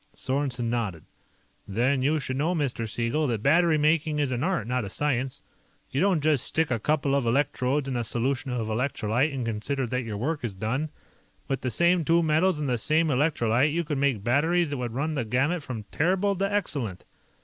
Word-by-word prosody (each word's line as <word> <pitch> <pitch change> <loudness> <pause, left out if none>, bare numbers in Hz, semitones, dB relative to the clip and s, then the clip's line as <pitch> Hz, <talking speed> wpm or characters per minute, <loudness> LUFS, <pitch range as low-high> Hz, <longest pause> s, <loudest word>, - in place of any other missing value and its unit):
Sorensen 130 -3 -1
nodded. 110 -9 -2 0.6
"Then 125 +7 +1
you 150 +4 +2
should 130 -2 -4
know, 160 +6 0
Mr. 125 -7 -2
Siegel, 120 +7 0
that 115 -4 -2
battery 165 +2 +4
making 155 0 +2
is 145 -3 0
an 125 +1 -1
art, 180 - 0
not 125 +1 -1
a 100 - -5
science. 130 +1 -2 0.5
You 135 - 0
don't 190 -5 +3
just 150 -4 +3
stick 160 -3 0
a 115 - +1
couple 145 +2 +1
of 140 -4 +1
electrodes 135 +2 +1
into 130 -3 -1
a - - -1
solution 125 +4 -1
of 125 -3 -2
electrolyte 125 +3 0
and 130 -3 -3
consider 115 +5 -2
that 125 +2 -2
your 110 -4 -5
work 145 +5 -2
is 110 -5 -3
done. 125 +10 -2 0.6
With 135 -1 -2
the 130 - -1
same 170 +8 +3
two 165 +2 +3
metals 160 +2 +2
and 150 - -2
the 125 -2 0
same 155 +6 +2
electrolyte, 130 -1 +2
you 170 +3 0
could 150 -3 -2
make 135 -8 +1
batteries 160 +7 +2
that 145 - -2
would 120 -2 -4
run 155 +4 -1
the 135 -5 -1
gamut 135 +10 0
from 125 -6 -6
terrible 190 +5 +1
to 195 +2 0
excellent. 140 - -2
135 Hz, 205 wpm, -26 LUFS, 120-155 Hz, 0.6 s, battery